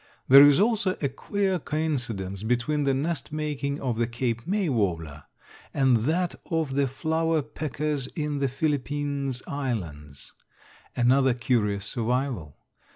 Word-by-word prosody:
There 140 +2 +10
is 145 +2 +5
also 210 -3 +2
a 140 - 0
queer 190 +7 -1
coincidence 120 - -2
between 125 +6 0
the 135 - +3
nest 155 +4 -2
making 150 -2 -2
of 120 -4 -2
the 120 - +2
Cape 120 +1 -3
May 200 0 +1
warbler 85 - -1 0.5
and 135 -3 +4
that 160 +10 0 0.2
of 160 -5 -1
the 140 0 +2
flower 160 +3 0
peckers 150 -1 -3
in 150 -2 -2
the 140 - +1
Philippines 140 -1 -2
Islands 85 - -5 0.6
another 130 +1 +3
curious 105 -5 0
survival. 115 - -2
135 Hz, 130 wpm, -26 LUFS, 120-150 Hz, 0.6 s, There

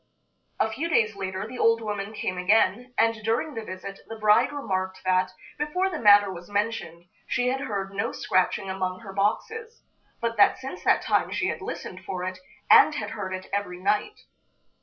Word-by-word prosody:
A - - +3
few 310 +9 -3
days 215 -9 +2
later 190 0 -4
the 250 +2 -8
old 230 0 +4
woman 210 -2 -4
came 195 -4 -3
again, 220 +5 +2
and 225 0 +4
during 230 +8 0
the 225 - -5
visit 195 0 -8
the 225 - -7
bride 210 +3 +4
remarked 190 -9 -3
that, 185 0 +2 0.3
before 360 +6 0
the 325 - -4
matter 205 -2 +6
was 175 +1 -10
mentioned, 205 -5 -2 0.2
she 250 +1 +1
had 265 +1 -1
heard 195 -6 -3
no 200 +4 -1
scratching 185 +1 0
among 185 0 -3
her 195 -4 -9
boxes, 445 - -2 0.4
but 230 -1 -2
that 205 - +5
since 265 +7 -8
that - - +4
time - - +1
she - - 0
had - - -4
listened 185 +1 -6
for 180 0 -4
it, 185 0 -4 0.3
and - - +7
had - - -4
heard 190 -3 -5
it 185 0 -5
every 200 -3 -2
night. 210 - 0
205 Hz, 185 wpm, -26 LUFS, 190-230 Hz, 0.4 s, and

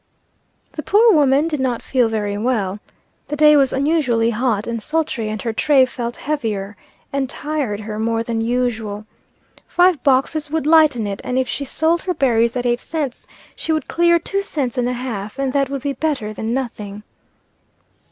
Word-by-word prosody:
The 305 - -5
poor 430 +6 +5
woman 290 -1 +3
did 305 -3 -2
not 250 -3 -1
feel 250 -4 +1
very 205 -2 -2
well. 210 -3 -1 0.5
The 295 - -3
day 300 0 +6
was 275 -2 +4
unusually 265 -5 +1
hot 230 -2 0
and 230 -1 -3
sultry, 300 -5 -1
and 215 0 -4
her 230 -2 -2
tray 275 +1 +4
felt 240 -2 -5
heavier, 220 -9 -3 0.4
and 275 -2 -1
tired 280 -9 -3
her 215 0 -5
more 225 +1 0
than 230 -1 -2
usual. 225 -3 -2 0.6
Five 355 -3 +3
boxes 290 +3 +1
would 315 -1 -1
lighten 305 -7 +4
it, 200 0 -4
and 250 - -2
if 260 -1 +1
she 280 - -3
sold 320 +5 +1
her 365 -2 -2
berries 235 -3 +2
at 250 0 -2
eight 240 0 +1
cents, 295 -5 -4 0.3
she 325 - -3
would 310 -3 -1
clear 340 0 +3
two 395 +4 -2
cents 285 -11 -2
and 245 -1 0
a - - -1
half, 235 -3 -5
and 270 -1 -1
that 275 -2 +1
would 275 -2 -4
be 285 -1 -1
better 265 -7 -2
than 220 +1 -4
nothing. 210 -5 -4
255 Hz, 180 wpm, -19 LUFS, 225-300 Hz, 0.6 s, day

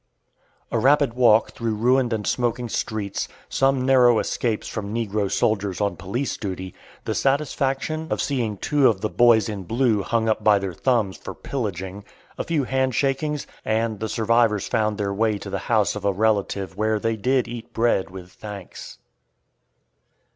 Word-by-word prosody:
A - - +1
rapid 140 -2 +3
walk 115 -3 +4
through 115 -2 -2
ruined 125 +3 +2
and 110 -2 -2
smoking 120 -1 -1
streets, 105 -3 -3 0.2
some 135 -1 +2
narrow 125 -3 +5
escapes 110 0 -1
from 100 -2 -5
negro 105 -3 -1
soldiers 100 -3 0
on 100 -1 0
police 120 +9 -3
duty, 95 -3 -5 0.3
the - - -1
satisfaction 140 +2 0
of - - -1
seeing 120 -7 -1
two 145 +5 +3
of 100 -4 +1
the 110 - -1
"boys 115 -2 +4
in 105 -3 -4
blue" 115 +2 +1
hung 115 +3 0
up 110 - 0
by 105 -1 +5
their 95 -2 -3
thumbs 110 -2 0
for - - -8
pillaging, 100 -6 -4 0.3
a - - -3
few 160 -4 0
handshakings, 135 +3 0 0.2
and 110 -1 -1
the 110 +1 -3
survivors 115 -2 +2
found 110 -1 0
their 100 -1 -1
way 110 +1 +1
to 100 -1 -8
the 95 - -2
house 110 -4 +2
of 105 - -6
a 100 - +2
relative 100 -2 0
where 110 +1 +1
they 115 +1 0
did 125 +3 +1
eat 120 -1 -8
bread 115 -5 +1
with 90 -1 -10
thanks. 100 -3 -9
110 Hz, 165 wpm, -23 LUFS, 100-125 Hz, 0.3 s, narrow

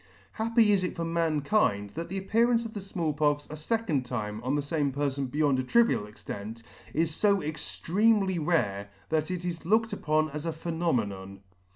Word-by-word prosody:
Happy 225 -1 +3
is 195 -2 +3
it 180 - -2
for 170 - -2
mankind 155 - +1
that 165 +9 -5
the 195 - -3
appearance 230 +4 +2
of 225 - -6
the 205 - -5
Small 170 -5 -2
Pox 145 0 +1
a - - -5
fecond 160 - -1
time 110 -4 -4
on 130 +3 0
the 145 - +1
fame 145 -1 0
perfon 140 -1 -1
beyond 145 -1 +2
a - - 0
trivial 230 - +3
extent, 105 +2 -8 0.3
is 160 0 -1
fo 200 -2 +4
extremely 190 +6 +1
rare, 105 - 0 0.2
that 155 0 0
it 180 -1 -3
is 170 -2 -4
looked 225 +6 +2
upon 155 0 +1
as 150 +3 -5
a 165 - -1
phenomenon. 115 - -2
155 Hz, 180 wpm, -28 LUFS, 135-190 Hz, 0.3 s, fo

